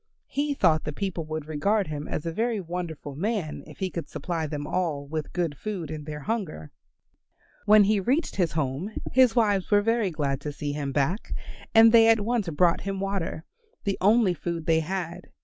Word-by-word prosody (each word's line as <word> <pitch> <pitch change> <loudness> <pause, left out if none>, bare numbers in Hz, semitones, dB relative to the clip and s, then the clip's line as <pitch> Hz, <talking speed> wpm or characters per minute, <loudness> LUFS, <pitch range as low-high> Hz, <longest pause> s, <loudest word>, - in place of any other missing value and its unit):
He 285 +1 -1
thought 160 - +3
the 150 - -3
people 175 -1 -3
would 155 -1 -4
regard 195 +7 +1
him 150 -2 -5
as 155 - -4
a 165 - -1
very 225 +4 0
wonderful 170 -5 -5
man 190 -2 -2
if - - -12
he 190 -2 -2
could 170 - -5
supply 165 -3 -3
them 145 -1 -4
all 155 -4 -1
with 155 +1 -4
good 170 -4 -1
food 180 -4 -5
in 155 -2 -6
their 150 -1 -6
hunger. 175 - -4 1.0
When 210 0 +8
he 205 +1 +3
reached 260 - 0
his 175 -5 +1
home 150 +4 -1 0.2
his 255 -2 +5
wives 205 -5 +2
were 205 -1 +4
very 225 -2 +2
glad 140 -4 -2
to 150 - -4
see 145 0 -4
him 145 -1 -3
back, 150 +9 -1 0.4
and 225 0 +9
they 225 -1 +7
at 225 -1 +5
once 220 -3 0
brought 170 +2 +2
him 195 -1 -3
water, 195 -4 -3 0.4
the 200 -2 -1
only 210 -1 +4
food 170 -1 -4
they 160 0 +3
had. 175 +1 -4
175 Hz, 195 wpm, -26 LUFS, 155-210 Hz, 1.0 s, and